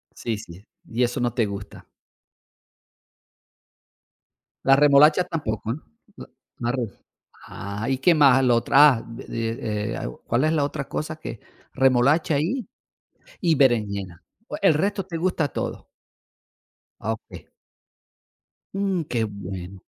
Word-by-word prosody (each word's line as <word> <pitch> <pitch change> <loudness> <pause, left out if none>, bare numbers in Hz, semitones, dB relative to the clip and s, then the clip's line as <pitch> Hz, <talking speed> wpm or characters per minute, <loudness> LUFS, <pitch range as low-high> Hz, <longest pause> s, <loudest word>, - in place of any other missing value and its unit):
Sí, 115 -3 -3
sí. 100 -1 -12 0.2
Y 120 +2 -1
eso 120 0 -1
no 120 -1 0
te 115 -2 +1
gusta. 100 0 -8 2.8
La 135 0 +7
remolacha 150 +4 +6
tampoco, 115 - -3
¿eh? - - -5 0.4
L - - -9 0.3
la 120 0 0
re 125 -3 -2 0.6
Ah, 100 +4 -6
¿y 130 - 0
qué 170 +5 +4
más? 135 -3 +5
Lo 120 -1 +4
otra, 140 +4 +6
ah, - - -8
de 115 -2 -4
eh, - - -4 0.2
¿cuál 125 +5 +1
es 155 - +2
la 150 -3 +1
otra 140 -1 -4
cosa 155 +1 -4
que? 135 -8 -8 0.3
Remolacha 135 +4 +3
y, 215 - -2 0.7
y 170 -5 +2
berenjena. 100 -9 +1 0.4
El 190 -5 +5
resto 195 +4 -1
te 175 -3 -7
gusta 170 -3 0
todo. - - -5 1.1
Okey. 110 +1 -6 1.3
Mm, 195 -3 0
qué 115 -4 -1
bueno. 95 -2 -8
125 Hz, 125 wpm, -24 LUFS, 110-155 Hz, 2.8 s, La